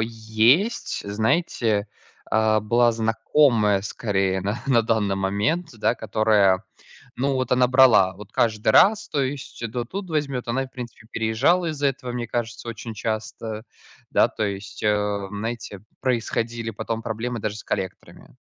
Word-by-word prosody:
есть, 115 - +1
знаете, 110 -1 0 0.4
а 110 -1 +3
была 120 +2 +3
знакомая 115 -1 +2
скорее 95 -2 -1
на 105 +5 -3
на 120 -4 +4
данный 110 -3 +1
момент, 105 - 0
да 110 - +2
которая, 105 -4 +2 0.5
ну, 135 +3 0
вот 130 -1 -2
она 125 0 +4
брала 125 -8 +5
вот 100 +1 -12
каждый 110 -2 +1
раз, 210 - +5
то 145 - 0
есть 135 -2 -5
то 120 -1 -2
тут 190 +6 -6
возьмет. 140 -6 -2
Она 130 +3 0
и 130 - -8
в - - -28
принципе 120 -3 -9
переезжала 130 +11 +2
из-за 145 -2 0
этого, 130 -2 -3
мне 120 -1 -4
кажется, 120 0 -4
очень 115 0 -7
часто. 110 +1 -4 0.5
Да, - - +4
то 110 - -4
есть, 100 0 -5
э, 105 -1 0
знаете, 105 -1 -5 0.2
происходили 115 -2 -1
потом 115 0 -4
проблемы 115 +1 -4
даже 105 0 -3
с - - -9
коллекторами. 95 -2 -6
115 Hz, 150 wpm, -23 LUFS, 105-125 Hz, 0.5 s, брала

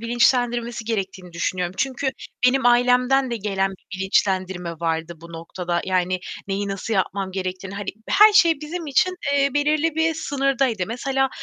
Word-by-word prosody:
bilinçlendirmesi 240 0 +1
gerektiğini 190 -5 -4
düşünüyorum. 180 +1 -2
Çünkü 265 0 -1 0.4
benim 260 0 +3
ailemden 250 +2 +3
de 235 - -1
gelen 195 -2 -1
bir 190 0 -11
bilinçlendirme 190 -2 0
vardı 165 0 -3
bu 170 0 -12
noktada. 175 +1 -3
Yani, 185 -1 0 0.3
neyi 200 +1 -2
nasıl 195 +3 -3
yapmam 195 0 -1
gerektiğini 185 +1 -4
hani, 200 -1 -6 0.2
her 425 +1 +7
şey 335 -7 +5
bizim 325 +2 -5
için, 365 +6 +2 0.2
eee, 280 0 +3
belirli 300 +2 +1
bir 320 0 +1
sınırdaydı. 270 - 0
Mesela, 270 +3 0
225 Hz, 145 wpm, -22 LUFS, 185-270 Hz, 0.4 s, her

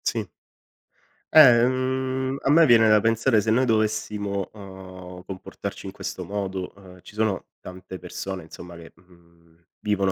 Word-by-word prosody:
Sì. - - -1 1.1
Eh, 125 -6 +8
mhmm, 130 +1 -1
a - - -1
me 165 +2 +7
viene 115 -4 +6
da 105 0 +6
pensare 115 +2 +2
se 110 +1 0
noi 125 +4 +3
dovessimo, 105 -3 -1
uhm, 95 -3 -11
comportarci 95 0 -8
in - - -7
questo 90 - -6
modo, 95 -1 -4
ehm, 95 -2 -15
ci - - -14
sono 110 -2 -1 0.2
tante 95 0 -9
persone 95 +1 -6
insomma 85 +2 -11
che, 85 -1 -12
mhmm, 85 -1 -25 0.2
vivono 100 -2 0
100 Hz, 150 wpm, -24 LUFS, 90-115 Hz, 1.1 s, Eh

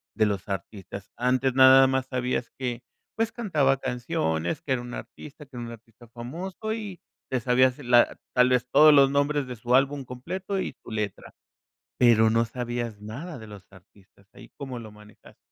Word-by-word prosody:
de 110 - +3
los 100 -3 -2
artistas, 100 0 -7
antes 130 +1 +1
nada 130 +1 +8
más 130 0 0
sabías 125 -2 -2
que, 125 -2 -4 0.4
pues, 225 0 0
cantaba 155 - +1
canciones, 100 -11 -2
que 140 - -6
era 125 -2 +1
un 120 0 -9
artista, 150 +1 -10
que 135 -2 -13
era 120 - -5
un 115 - -8
artista 115 +1 -17
famoso 170 - -6
y 205 -5 -7 0.3
te 130 - 0
sabías 125 +1 +3
la 120 -3 +3 0.2
tal 125 0 +5
vez 125 0 +1
todos 150 +3 +7
los 140 -1 +6
nombres 140 0 0
de 125 - -6
su 120 +2 -2
álbum 135 +1 +2
completo 185 +11 -5
y - - -4
su - - -11
letra. 105 -3 -4 0.7
Pero 110 -2 +5
no 115 +1 +2
sabías 120 -2 -5
nada 135 +11 -8
de 110 - -11
los 100 -2 -12
artistas. 100 +1 -21
¿Ahí - - -14
cómo 135 -3 -6
lo 110 -2 -10
manejaste? 105 0 -18
125 Hz, 180 wpm, -26 LUFS, 115-135 Hz, 0.7 s, nada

